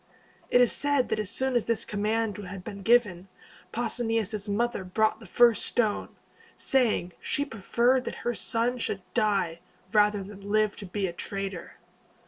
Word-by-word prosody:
It 245 - +5
is 245 - +4
said 285 -3 +1
that - - 0
as 210 -3 -3
soon 260 +3 -1
as 240 - +2
this 230 -1 -1
command 215 0 -1
had 195 -2 -7
been 200 +1 -7
given, 205 -5 +3 0.4
Pausanias' 225 -3 -1
mother 235 0 0
brought 215 +4 +1
the 225 - -12
first 240 -2 +4
stone, 220 -4 0 0.5
saying 230 -9 +1
she 285 - 0
preferred 245 +2 +1
that - - -4
her 240 - +1
son 235 +2 0
should 195 -4 -2
die, 200 -7 +1 0.3
rather 210 -1 +3
than 200 +1 -11
live 215 0 +2
to 200 - -7
be 195 +2 -2
a 175 - -3
traitor. 195 0 -4
215 Hz, 160 wpm, -27 LUFS, 200-240 Hz, 0.5 s, It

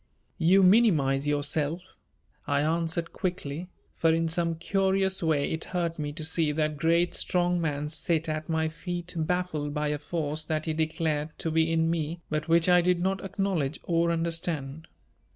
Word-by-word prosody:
"You 190 +4 +5
minimize 160 - +4
yourself," 145 +3 0 0.6
I 145 0 +2
answered 165 +2 -1
quickly, 175 -2 -4 0.2
for 165 - +2
in 165 0 +1
some 165 0 0
curious 190 +2 +1
way 155 -4 +1
it 160 - -2
hurt 170 -2 -2
me 150 -1 -2
to 155 +1 -6
see 160 -1 +1
that 155 0 -1
great 170 +3 +2
strong 175 -1 0
man 150 -2 -1
sit 160 +1 0
at 155 +1 -3
my 160 0 +1
feet 175 +2 -5
baffled 160 -3 -1
by 150 0 0
a 150 0 -2
force 155 0 -3
that 155 -1 -1
he 160 - -1
declared 155 -1 -1
to 160 - -2
be 160 +1 +2
in 165 0 +2
me 165 0 -2
but 155 +1 -1
which 165 +1 +3
I 180 -1 +6
did 180 0 +2
not 190 +2 -1
acknowledge 190 -7 -1
or 170 0 +1
understand. 165 -3 -2
165 Hz, 170 wpm, -27 LUFS, 155-175 Hz, 0.6 s, I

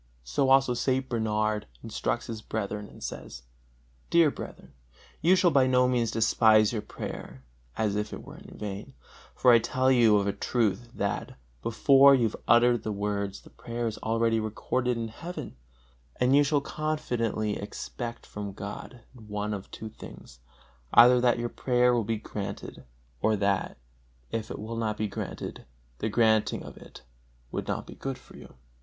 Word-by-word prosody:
So 60 - 0
St. 130 0 -1
Bernard 110 - 0 0.2
instructs - - -2
his 115 -2 -6
brethren 105 -1 -4
and - - -13
says: - - -7 0.7
"Dear 165 -3 +5
brethren, - - -9 0.5
you 180 +3 +5
shall 180 -2 +4
by 135 -3 +4
no 125 0 +4
means 120 -3 +1
despise 110 -1 +4
your 110 - -1
prayer, 65 -9 -8 0.3
as 105 -2 0
if 105 0 -2
it - - -7
were - - -11
in - - -13
vain, 105 +5 -6 0.4
for 125 - +5
I 115 - +7
tell 130 +3 +1
you 115 -5 +5
of 100 - +1
a 100 - 0
truth 115 +2 -1
that, 100 0 -3 0.2
before 135 +4 +6
you 125 - +2
have 110 - 0
uttered 120 0 +5
the 110 - -3
words, 100 -1 -2
the - - -17
prayer 120 0 -5
is 110 -2 -3
already 115 0 +1
recorded 120 +3 -1
in 115 -1 -3
heaven; 165 - -7 0.6
and 125 +2 +3
you 145 - +6
shall 145 0 +1
confidently 120 -9 -2
expect 115 +3 -6
from 100 -1 -6
God 100 +5 -8
one 105 -3 -4
of 100 -2 -6
two 110 - -7
things: 65 - -12 0.6
either 125 +1 +8
that 120 -1 +3
your 120 0 -1
prayer 125 0 +2
will 120 -2 +2
be 110 +1 -1
granted, 105 -2 -7 0.4
or 110 0 +3
that, 100 -1 0 0.5
if 110 -1 -3
it - - -5
will 110 +2 -6
not 110 -2 -1
be 110 - -1
granted, 100 - -6 0.3
the 110 - -1
granting 110 -1 +2
of - - -10
it - - -14 0.5
would - - -4
not - - -2
be - - -10
good 135 -1 -5
for - - -17
you." - - -13
115 Hz, 170 wpm, -28 LUFS, 105-125 Hz, 0.7 s, either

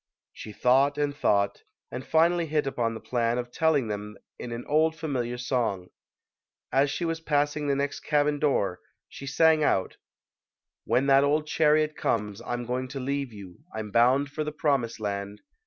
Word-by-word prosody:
She 110 - -9
thought 135 +6 +3
and 145 -1 -1
thought, 100 -7 +1 0.3
and 125 +2 -5
finally 165 +3 +2
hit 150 -1 0
upon 115 -4 -1
the - - -6
plan 120 0 -1
of 120 0 -4
telling 150 -4 +2
them 105 0 -5 0.2
in 120 - -6
an 120 +1 -5
old 160 +2 +2
familiar 130 -7 -3
song. 120 -7 -2 0.8
As 140 +2 +3
she 170 - -2
was 165 0 -2
passing 145 -1 0
the 140 - +2
next 140 +1 -2
cabin 145 -1 +1
door 100 -11 +1 0.3
she 140 - -10
sang 155 +2 +4
out: 95 -9 0 0.9
When 130 - +2
that 135 0 +5
old 150 +2 +1
chariot 155 0 +2
comes, 105 -1 -2
I'm 120 0 -3
going 125 +2 -2
to 135 +1 -6
leave 140 0 -2
you; 100 -4 -11 0.2
I'm 110 -1 -5
bound 130 +5 +3
for 155 +1 -3
the 150 - -4
promised 140 -7 0
land. 100 -1 -4
135 Hz, 170 wpm, -27 LUFS, 115-150 Hz, 0.9 s, that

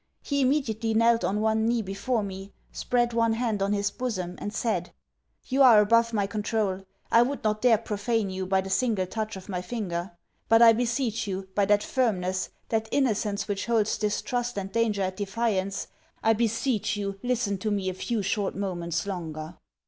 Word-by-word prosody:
He 280 -1 0
immediately 230 -5 +1
knelt 230 +1 +4
on 210 +2 0
one 220 0 +2
knee 235 -1 +1
before 205 +4 -1
me; 195 0 -7 0.2
spread 240 -1 0
one 230 -1 +2
hand 225 -3 -1
on 200 +1 +1
his 205 0 0
bosom, 185 -8 -3
and 205 - -4
said 210 -5 -2 0.5
'You 270 +1 +1
are 240 -5 +8
above 230 +2 +4
my 205 -3 +1
controul. 205 -2 -2 0.2
I 230 - +7
would 270 +4 -1
not 215 0 0
dare 240 -3 +5
profane 215 -1 -1
you, 185 0 -4
by 190 0 +2
the 190 - -7
single 215 -3 +1
touch 215 +2 -4
of 190 -1 -10
my 180 -3 -3
finger. 180 -4 -4 0.4
But 225 +1 +7
I 230 -1 +9
beseech 230 -1 -1
you, 190 0 -4
by 200 +1 +2
that 205 +1 +3
firmness, 190 -7 0 0.2
that 220 -1 -1
innocence 215 -6 0
which 200 +1 -3
holds 225 -2 +1
distrust 240 +3 -1
and 195 -1 -4
danger 220 -3 +1
at 185 0 -3
defiance, 200 -1 -1 0.4
I 225 - +5
beseech 225 -1 0
you 195 -1 -4
listen 235 -6 -1
to 215 - -2
me 200 -2 -1
a 185 - -1
few 215 +3 -2
short 200 +1 -1
moments 175 -4 -2
longer.' 165 -4 -5
210 Hz, 185 wpm, -27 LUFS, 195-230 Hz, 0.5 s, I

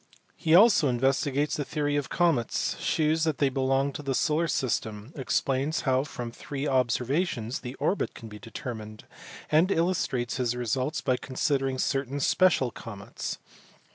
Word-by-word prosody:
He 160 0 +3
also 195 -6 +6
investigates 135 +3 +1
the 145 - -1
theory 145 +1 -1
of 145 -2 -1
comets, 165 -10 +1
shews 155 +1 +1
that 155 -3 0
th^y 135 -2 +1
belong 135 +1 +1
to - - -6
the 135 -2 -2
solar 160 +4 +1
system, 110 -3 -2
explains 135 +1 0
how 130 0 +1
from 125 -5 -6
three 140 +4 -5
observations 130 0 0
the 125 +1 -7
orbit 155 +8 -1
can 115 - -9
be 105 -1 -10
de 115 - -11
termined, 110 -3 -7 0.5
and 160 +5 +4
illustrates 165 -10 0
his 120 -2 0
results 130 +5 -1
by 130 -2 +1
considering 135 0 -1
certain 135 +1 -1
special 145 -4 +3
comets. 105 -4 -7
135 Hz, 150 wpm, -27 LUFS, 125-150 Hz, 0.5 s, also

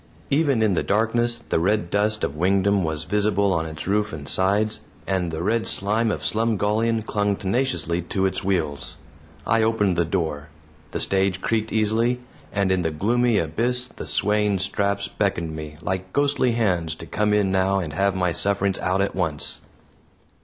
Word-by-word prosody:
Even 140 -5 +3
in 105 -3 +3
the - - +1
darkness 115 +3 0
the - - +2
red 95 0 0
dust 105 +1 +1
of 70 - -1
Wingdam 95 +3 +2
was 80 -1 -2
visible 100 +1 +1
on 80 -2 -1
its 80 -2 -7
roof 105 +2 0
and 75 -2 -7
sides, 105 +3 +1 0.2
and 95 -3 0
the 80 +1 -4
red 110 +4 0
slime 110 +3 +1
of - - -2
Slumgullion 110 0 +1
clung 105 -1 0
tenaciously 95 - -1
to 95 +3 -1
its 95 - -1
wheels. 80 -7 -2 0.5
I 115 0 +3
opened 105 -5 +2
the 85 - +3
door; 80 -4 -2 0.4
the - - -4
stage 95 -1 +1
creaked 110 -1 -1
easily, 110 +3 +1 0.3
and 100 -2 +1
in 95 -1 +2
the 80 - 0
gloomy 115 +8 +1
abyss 120 +10 0
the - - -9
swaying 105 -1 +2
straps 100 +1 -1
beckoned 85 -6 -2
me, 75 -1 -7
like 95 0 -3
ghostly 140 -4 +2
hands, 90 -8 0
to - - -10
come 105 0 0
in 105 -2 +2
now 95 +1 +2
and 85 -6 -3
have 100 +3 +1
my 90 -2 +1
sufferings 100 +2 +1
out 95 +1 0
at 100 - 0
once. 75 -3 -2
100 Hz, 175 wpm, -23 LUFS, 90-110 Hz, 0.5 s, Even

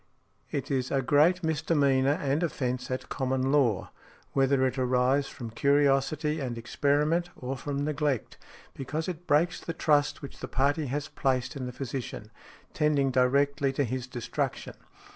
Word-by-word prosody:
It - - -3
is 130 -2 0
a 135 -1 0
great 155 +7 +4
misdemeanor 145 -4 +2
and 140 +3 0
offence 130 -7 -2
at 130 0 -3
common 130 0 0
law, 125 -10 +2 0.4
whether 135 -1 +3
it 130 +1 -1
arise 130 +2 +2
from 115 -3 -8
curiosity 140 +4 +2
and 125 -4 -3
experiment, 150 +8 +1
or 130 +2 -4
from 140 +1 -3
neglect; 150 -4 -1 0.3
because 150 +4 -4
it 175 -1 -6
breaks 160 +4 +2
the 165 - -4
trust 145 -3 +1
which 140 - -9
the - - -5
party 145 +3 +1
has 145 +3 -3
placed 130 0 -1
in 130 -2 -4
the - - -5
physician, 125 -4 -6 0.4
tending 145 -3 +2
directly 140 +2 +2
to 140 - +1
his 130 0 -3
destruction. 120 -2 -3
140 Hz, 150 wpm, -28 LUFS, 130-150 Hz, 0.4 s, great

